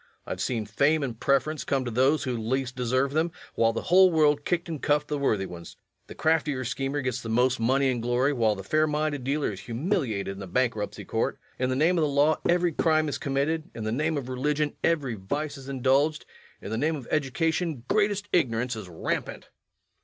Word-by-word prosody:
I - - -7
have - - -3
seen 115 -4 -1
fame 140 +9 +2
and 120 -4 -4
preference 140 +3 +1
come 135 -2 0
to 120 - -3
those 135 +7 +3
who 130 -3 -2
least 125 +3 -2
deserved 130 +2 0
them, 160 +2 +1 0.2
while 115 0 +3
the 115 - -4
whole 185 +1 +6
world 150 -2 +3
kicked 175 0 0
and 160 -4 -5
cuffed 150 0 +1
the 150 - -1
worthy 110 -8 +1
ones. 85 -2 -10 0.3
The - - -10
craftier 150 -5 +1
schemer 135 +4 -2
gets 125 -1 -2
the 115 - -6
most 125 +2 +2
money 135 +4 +2
and 120 -2 -2
glory, 125 +4 +1
while 110 -5 +2
the 95 - -7
fair 155 +10 +2
minded 150 -2 -1
dealer 140 +1 0
is 95 - -8
humiliated 120 - -2
in 100 0 -6
the 100 - -7
bankruptcy 110 +1 -1
court. - - -1 0.2
In 130 0 +1
the 130 - 0
name 165 +6 +3
of - - +2
the 155 - +3
law 145 +2 +3
every 175 0 +3
crime 155 -1 +2
is - - -3
committed; 145 +3 -1
in 115 - -5
the 110 - -2
name 155 +6 0
of 135 -3 -4
religion 145 +3 -1
every 145 -7 +1
vice 145 +10 -3
is 135 -1 -10
indulged; 135 +3 +1 0.4
in 100 - -6
the 110 - -1
name 155 +3 +1
of 135 -6 -8
education 155 0 0
greatest 205 -1 +1
ignorance 125 -6 +1
is 105 -4 -8
rampant. 80 - -4
135 Hz, 215 wpm, -27 LUFS, 120-155 Hz, 0.4 s, whole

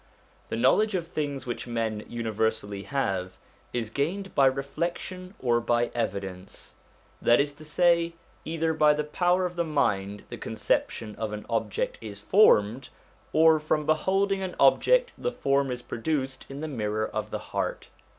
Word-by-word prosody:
The - - -2
knowledge 190 - +3
of 175 -3 -1
things 145 -4 -3
which 120 -1 -4
men 110 -3 -2
universally 110 -3 -1
have, 95 -7 -2 0.3
is 115 -3 -3
gained 185 - -2
by 135 -2 +5
reflection 175 +7 -3
or 120 -2 +2
by 120 0 +1
evidence: 95 -5 -4 0.5
that 120 - +5
is 145 0 +1
to 155 +2 -13
say, 170 +2 +2 0.3
either 160 0 -1
by 150 -1 +4
the 150 - -1
power 180 +4 +1
of 180 0 -4
the 170 - +1
inind 105 -10 0
the - - -7
conception 110 -2 -1
of 110 -1 -3
an 105 0 -6
object 110 -2 -1
is 105 -3 -7
formed, 125 - +4 0.4
or 160 0 +5
from 150 0 0
beholding 195 +5 +1
an 185 -1 -4
object - - +4
the 485 - -1
form 140 - +1
is 125 -1 -4
produced 135 +1 -3
in 135 +1 -7
the 155 - -3
mirror 110 -6 -1
of - - -4
the - - -3 0.2
heart. - - -2
135 Hz, 160 wpm, -27 LUFS, 110-165 Hz, 0.5 s, by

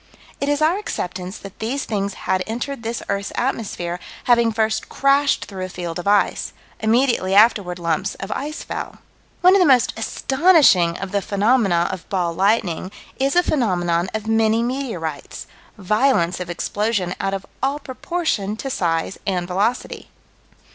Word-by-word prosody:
It 280 - -1
is 290 +1 +1
our 340 +6 +3
acceptance 185 - -5
that 195 0 -12
these 255 +6 -2
things 200 -2 -2
had 185 0 +1
entered 240 +4 -4
this 230 +1 -4
earth's 200 0 -2
atmosphere, 195 -8 -2 0.2
having 235 -2 +4
first 220 0 -1
crashed 275 +1 +2
through 190 -2 -7
a - - -7
field 175 -1 -5
of 175 - -5
ice 205 0 +2 0.3
"immediately 220 -4 +2
afterward 205 -4 +4
lumps 170 +3 -1
of 195 +2 -7
ice 300 +6 -4
fell." - - -6 0.4
One 365 +1 +7
of 395 - +5
the 360 - +5
most 255 -4 +4
astonishing 265 - +3
of 195 -1 -6
the 200 0 0
phenomena 200 -4 +2
of 185 -3 -8
"ball 175 -3 0
lightning" 190 -1 +1 0.3
is 275 +3 +1
a 355 - +5
phenomenon 180 - 0
of 220 0 -4
many 225 +1 +2
meteorites: 230 - -4 0.3
violence 210 -3 +2
of 180 -1 -5
explosion 195 +1 -1
out 195 0 -1
of 195 - -6 0.2
all 275 +2 0
proportion 260 - -2
to 270 +3 -4
size 165 -3 -1
and 180 -3 -1
velocity. 200 +7 -2
210 Hz, 155 wpm, -21 LUFS, 185-255 Hz, 0.4 s, One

